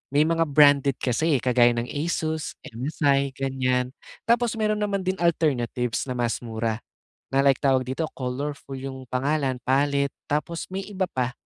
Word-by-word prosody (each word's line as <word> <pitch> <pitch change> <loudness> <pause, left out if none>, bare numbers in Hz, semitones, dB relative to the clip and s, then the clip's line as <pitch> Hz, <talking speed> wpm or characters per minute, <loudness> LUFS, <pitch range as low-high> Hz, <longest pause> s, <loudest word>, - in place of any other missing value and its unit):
may 150 - +6
mga 165 0 +1
branded 140 -2 +5
kasi, 150 +5 +1
eh, - - -5
kagaya 120 -1 +4
ng 120 +1 -3
Asus, 155 0 -2
MSI, 140 +2 0
ganyan. 130 -2 0 0.3
Tapos 235 0 +2
meron 215 -1 0
naman 200 -2 -1
din 190 +1 -1
alternatives 135 -8 0
na 125 - -3
mas 120 -1 0
mura 115 -1 -3 0.5
na 135 - +2
like 135 -2 +4
tawag 130 -2 +3
dito, 135 +5 -2
Colorful 135 +2 -5
yung 130 -1 -6
pangalan, 135 +1 0
Pallet 140 +1 +2 0.2
tapos 160 +3 -2
may 190 +1 -4
iba 190 -2 -2
pa. 125 -1 -1
140 Hz, 155 wpm, -25 LUFS, 125-160 Hz, 0.5 s, may